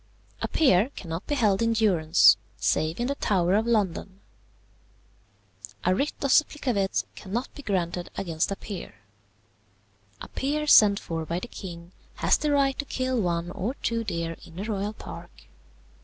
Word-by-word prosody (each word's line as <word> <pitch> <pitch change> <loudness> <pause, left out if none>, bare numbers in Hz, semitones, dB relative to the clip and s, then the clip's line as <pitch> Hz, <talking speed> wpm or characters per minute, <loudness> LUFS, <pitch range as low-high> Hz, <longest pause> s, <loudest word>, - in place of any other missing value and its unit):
"A - - 0
peer 240 - +3
cannot 165 +1 -6
be 290 - 0
held 210 -7 +2
in 230 0 +2
durance, 180 -7 +5 0.2
save 155 +4 0
in 240 - 0
the 275 - 0
Tower 185 -9 +1
of 220 +3 +2
London. 195 -3 -1 1.7
"A 185 - +4
writ 280 +10 0
of 275 - +1
supplicavit 250 -11 +2
cannot 220 +6 -4
be 285 - -9
granted 180 -6 -2
against 165 -4 -1
a - - -1
peer. 195 -2 -8 1.2
"A - - -8
peer 295 +3 -2
sent 210 -8 +7
for 165 -1 -4
by 170 +2 -3
the - - -7
king 170 -2 -9 0.2
has - - +3
the 300 - -1
right 275 -2 +2
to 290 - -2
kill 255 -3 -1
one 175 -1 -1
or 220 +9 -3
two 230 -3 -2
deer 170 -5 -3
in 165 - -14
the 190 - -4
royal 205 -1 -2
park. - - -11
200 Hz, 160 wpm, -26 LUFS, 175-245 Hz, 1.7 s, sent